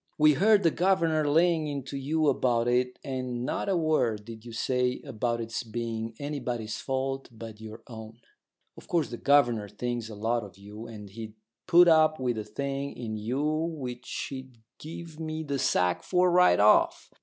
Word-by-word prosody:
We 150 0 +6
heard 205 +6 +4
the 165 - +4
governor 165 -5 +2
laying 165 0 +3
into 140 -1 -5
you 150 +3 0
about 120 -3 +2
it, 125 +1 +1
and 130 -3 -3
not 200 - -2
a 190 - +2
word 125 -10 +1
did 115 -1 -10
you 120 - -9
say 125 +2 0
about 120 +1 -2
it's 115 0 -3
being 115 -1 -4
anybody's 125 -7 -4
fault 135 0 -3
but 110 -1 -10
your 110 +1 -10
own. 110 -1 -10 0.6
Of - - -14
course 170 -6 0
the 120 - -5
governor 120 -8 +3
thinks 120 -1 -4
a 110 - -8
lot 115 +3 0
of 95 -2 -12
you, 105 +3 -10
and 105 -3 -9
he'd 110 0 -8 0.3
put 175 0 +7
up 155 -2 +5
with 125 -3 -1
a - - -3
thing 140 +6 -4
in 115 -3 -4
you 120 +7 -2
which 155 -6 -3
he'd 130 -2 -8 0.2
give 160 0 -9
me 160 0 -4
the 140 -2 -2
sack 90 -6 +1
for 180 -1 +2
right 175 - +5
off. 105 +1 +4
125 Hz, 180 wpm, -28 LUFS, 115-155 Hz, 0.6 s, put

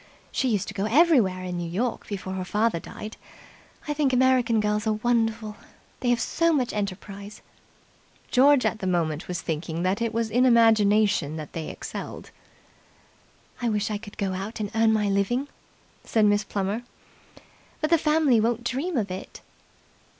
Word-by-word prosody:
She 265 - 0
used 210 -5 0
to - - -7
go 200 0 -2
everywhere 230 - +3
in 180 -1 -4
New 170 -1 -4
York 230 +8 -2
before 190 -2 -5
her 190 -1 -3
father 210 0 0
died. 215 +6 -9 0.7
I 295 - 0
think 290 -2 +1
American 250 -3 +3
girls 210 +1 0
are 215 - +2
wonderful. 225 -1 0 0.4
They 250 - -1
have 240 -1 +3
so 335 +6 +1
much 260 -6 0
enterprise." 200 0 -6 0.9
George 275 +1 +5
at 220 - 0
the 190 - -3
moment 165 -3 -1
was 175 -2 -4
thinking 165 +1 -3
that 190 +4 0
it 230 -1 0
was 225 -1 -1
in 245 +3 +3
imagination 215 - +4
that 155 -2 -7
they 160 -2 -4
excelled. - - -7 1.3
"I 240 - +1
wish 210 0 -1
I 210 - -2
could 205 -1 -12
go 195 -2 -1
out 200 +5 -5
and 205 -2 -3
earn 225 0 +3
my 215 -1 +1
living," 220 +8 0 0.5
said 220 -2 +2
Miss 205 0 +3
Plummer. 200 +3 -2 1.0
"But 310 +1 -1
the 335 - +5
family 300 -6 +3
won't 235 +1 0
dream 275 +7 -2
of 205 -5 -1
it." 185 - -8
215 Hz, 170 wpm, -25 LUFS, 195-240 Hz, 1.3 s, George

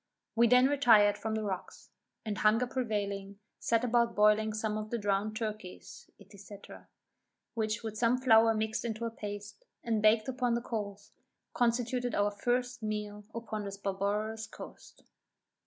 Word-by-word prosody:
We 235 +1 +5
then 250 +2 +6
retired 230 -7 +5
from 220 -1 -3
the 220 - -2
rocks; 190 -3 -6 0.3
and 205 -3 -3
hunger 220 +3 +3
prevailing, 205 -6 -3 0.2
set 230 0 +1
about 235 -1 +2
boiling 210 +1 +4
some 215 0 -2
of 215 0 -4
the 235 - -1
drowned 205 0 -1
turkeys, 215 -4 -7 0.2
&c. 200 0 -12 1.0
which 220 -1 -2
with 215 -1 -5
some 240 +1 +3
flour 225 -3 +5
mixed 220 0 -1
into 230 -1 -3
a 230 - -3
paste, 205 -2 -8 0.2
and 225 -2 0
baked 215 +2 +4
upon 250 -2 0
the 235 - -1
coals, 205 -4 -5 0.4
constituted 245 +1 0
our 205 0 +2
first 245 +3 -1
meal 210 -1 -4
upon 220 -2 -4
this 200 0 -6
barbarous 205 +3 -2
coast. - - -12
220 Hz, 150 wpm, -31 LUFS, 205-235 Hz, 1.0 s, then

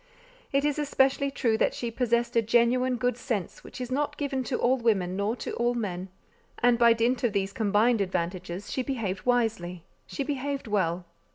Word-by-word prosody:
It 275 +1 +2
is 295 0 0
especially 280 -1 +2
true 235 -5 0
that - - +2
she 235 -1 -3
possessed 235 0 0
a 230 - +5
genuine 240 +3 +2
good 245 0 0
sense 210 -9 -4
which - - -10
is 250 0 -5
not 290 +3 -1
given 275 -3 -2
to 250 - -1
all 255 +2 +2
women 195 -6 +1
nor 200 +4 0
to - - -5
all 240 +1 0
men; 190 -5 -3 0.5
and 240 -1 +3
by 235 -1 +7
dint 235 +3 0
of 235 -4 +1
these 195 -1 -1
combined 215 +2 +2
advantages 185 0 -3
she 260 - -1
behaved 220 -8 -3
wisely—she 225 - -2
behaved 280 0 -3
well. 185 -5 0
235 Hz, 180 wpm, -27 LUFS, 200-255 Hz, 0.5 s, by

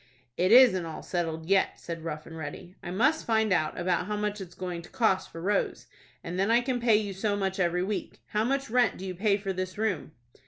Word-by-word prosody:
"It 185 +3 +2
isn't 235 -7 +7
all 160 - -7
settled 165 -3 -3
yet," 195 0 +2
said 165 -1 -6
Rough 155 -2 -5
and 165 - -10
Ready. 160 +3 -7
"I - - -7
must 265 - +2
find 220 -3 +2
out 155 -3 0
about 180 +1 0
how 210 - -1
much 210 0 -2
it's 175 -2 -9
going 180 -1 -4
to 170 - -14
cost 190 -5 +1
for 165 - -8
Rose, 195 +4 -1 0.4
and 175 +2 -4
then 195 +3 +2
I 235 +1 +5
can 250 0 -1
pay 235 -2 +4
you 210 -2 0
so 205 +2 -1
much 195 -1 -2
every 180 0 +1
week. 200 +2 -4
How 210 +1 +1
much 275 +1 -1
rent 245 -4 +3
do 190 - -7
you 185 - -4
pay 200 +2 +2
for 195 -1 -3
this 185 +1 -4
room?" 205 -9 -2
190 Hz, 235 wpm, -28 LUFS, 175-215 Hz, 0.4 s, isn't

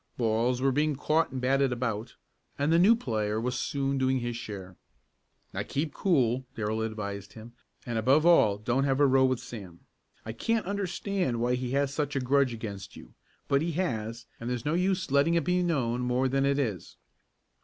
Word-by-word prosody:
Balls 120 +2 +1
were 135 - +4
being 150 +2 +1
caught 155 +4 +1
and 130 - -4
batted 135 +1 +2
about, 115 -2 -3 0.4
and 145 +3 +1
the 165 - +5
new 205 +6 +6
player 110 - -2
was 125 +2 -1
soon 135 0 -1
doing 130 0 +2
his 120 -1 -3
share. 95 -5 -7 0.8
"Now - - -2
keep 150 +2 -3
cool," 130 - +1
Darrell 110 0 -2
advised 100 -3 -5
him, 115 +1 -11 0.3
"and 120 -2 -2
above 135 +8 +3
all 110 -13 +5
don't 120 +6 0
have 135 0 +1
a 145 - +6
row 135 -1 +4
with 130 -2 +1
Sam. 95 -7 -10 0.4
I 110 - -4
can't 225 - -1
understand 190 - -2
why 120 +1 +1
he 125 0 -2
has 140 0 +1
such 145 0 -2
a - - +2
grudge 135 0 +2
against 100 -4 -7
you, - - -13 0.3
but 140 0 +2
he 165 +1 -1
has 115 -9 -3
and 115 - -5
there's 125 -2 -3
no 150 - +1
use 185 -2 0
letting 145 +4 +3
it 170 - +2
be 180 +1 +1
known 130 -9 0
any - - -1
more 125 +2 +1
than 135 +1 +1
it 140 0 +2
is." 110 - -3
130 Hz, 195 wpm, -28 LUFS, 115-145 Hz, 0.8 s, new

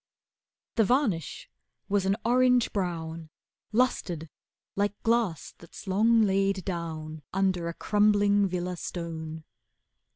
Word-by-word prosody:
The 225 - +5
varnish 215 - 0 0.4
was 195 -1 +1
an 195 - +3
orange 250 0 +3
brown 165 -4 -3 0.4
Lustered 180 -9 0 0.4
like 205 0 -1
glass 225 -8 0
that's 170 - -12
long 220 +4 +4
laid 195 -2 +1
down 160 -4 -5
Under 190 -3 +1
a 170 - -4
crumbling 205 -1 +3
villa 180 0 -3
stone. 160 -2 -6
190 Hz, 105 wpm, -28 LUFS, 170-210 Hz, 0.4 s, The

